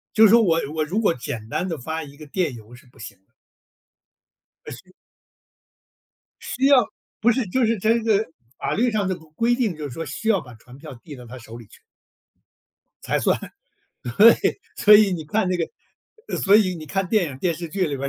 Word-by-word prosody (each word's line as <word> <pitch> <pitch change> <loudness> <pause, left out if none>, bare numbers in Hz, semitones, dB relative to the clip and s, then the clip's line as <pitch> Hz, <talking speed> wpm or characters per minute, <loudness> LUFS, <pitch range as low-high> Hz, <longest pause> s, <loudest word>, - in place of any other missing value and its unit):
就 220 - +7
是 215 - +7
说 230 +1 +6
我 165 -6 +2 0.2
我 155 -1 0
如 185 +8 -2
果 205 -6 +2
简 115 -3 -7
单 180 - -2
地 165 -4 -4
发 160 +5 -5
一 140 -2 -12
个 155 +1 -12
电 165 -2 -2
邮 115 +1 -13
是 130 +3 -17
不 125 - -23
行 110 -3 -10
的。 95 - -42 1.4
呃， - - -7
是。 - - -13 1.5
需 265 +2 -1
要， 275 -3 +6 0.4
不 240 +2 +4
是 255 +2 -1
就 255 +7 +1
是 225 -1 0
这 225 +4 +2
个 220 -1 +1 0.3
法 - - -3
律 240 +4 +1
上 210 -4 -1
的 185 - -2
规 160 -2 -17
规 235 +1 +2
定， 230 -9 -1
就 155 - -7
是 - - -10
说 165 - -5
需 225 - -5
要 200 -4 +3
把 125 -5 -13
传 125 +3 -16
票 150 -1 -10
递 150 -4 -10
到 125 -1 -12
他 125 +3 -10
手 115 -1 -12
里 115 - -12
去。 - - -20 1.2
才 - - 0
算。 - - +1 0.8
对， 230 +3 +8 0.4
所 210 0 +7
以 205 -2 +5
你 160 -3 -5
看 185 +4 0
这 180 - 0
个 435 - -8
所 200 +1 +4
以 190 -4 +3
你 155 -2 -9
看 195 +5 -2
电 210 -1 +2
影、 130 - -9
电 175 +1 0
视 170 +1 -7
剧 190 +4 -4
里 140 -2 -4
边 140 +1 -3
175 Hz, 230 characters per minute, -22 LUFS, 140-215 Hz, 1.5 s, 对